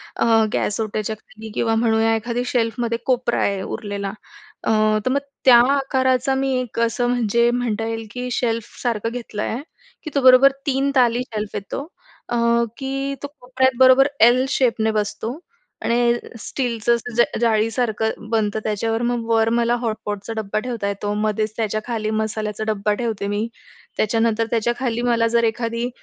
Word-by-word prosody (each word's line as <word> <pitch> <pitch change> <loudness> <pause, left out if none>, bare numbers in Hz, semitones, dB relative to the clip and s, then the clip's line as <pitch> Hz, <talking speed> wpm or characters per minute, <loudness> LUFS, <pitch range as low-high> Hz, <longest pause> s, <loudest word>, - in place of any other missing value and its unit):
अ, - - +1 0.3
gas 210 - -1
ओट्याच्या 215 0 -2
खाली 220 0 -12
किंवा 225 -1 +1
म्हणूया 225 0 +2
एखादी 235 +2 -2
शेल्फमध्ये 230 -1 0
कोपरा 250 -2 +1
आहे 200 -1 0
उरलेला 200 -1 -4 0.5
अ, - - -1 0.4
तर 255 - +1
मग 280 - +2 0.3
त्या 250 -2 +9 0.2
आकाराचा 265 -1 +1
मी 270 0 0
एक 230 -2 -6
असं 235 +1 +1
म्हणजे 235 -1 +2
म्हणता 235 -3 -1
येईल, 225 -1 -4
की 250 +2 -4
शेल्फसारखं 230 -1 -2
घेतलं 230 -3 -5
आहे. 245 +5 -3 0.4
की 310 - -6
तो 280 - +3
बरोबर 260 +1 +7 0.2
3 275 +1 +1
ताली 245 -2 +3
शेल्फ 210 -1 -4
येतो. 240 +9 -5 0.4
अ, 240 - 0 0.4
की 275 0 -3
तो - - -2
कोपऱ्यात 260 0 0
बरोबर 260 +1 +7
एल 245 +3 +6
शेपने 230 -5 +1
बसतो. 215 +5 -3 0.5
आणि 235 0 +3 0.3
स्टीलचं 235 -1 0 0.2
ज 240 - +6 0.2
जाळीसारखं 220 -1 0
बनतं 220 -2 0
त्याच्यावर 225 +2 -1
मग 240 -2 -2
वर 225 0 +3
मला 235 0 +2
हॉटपॉटचा 215 -1 -4
डब्बा 215 -1 -1
ठेवता 230 -3 -3
येतो 205 +1 -3
मध्येच 215 0 -1
त्याच्याखाली 215 0 -2
मसाल्याचा 215 -1 -3
डब्बा 210 -1 0
ठेवते 215 -4 -2
मी 205 +2 -1 0.5
त्याच्यानंतर 225 +1 +1
त्याच्याखाली 240 +1 0
मला 230 -1 +3
जर 235 - +4
एखादी 230 +1 -1
230 Hz, 150 wpm, -21 LUFS, 215-245 Hz, 0.5 s, त्या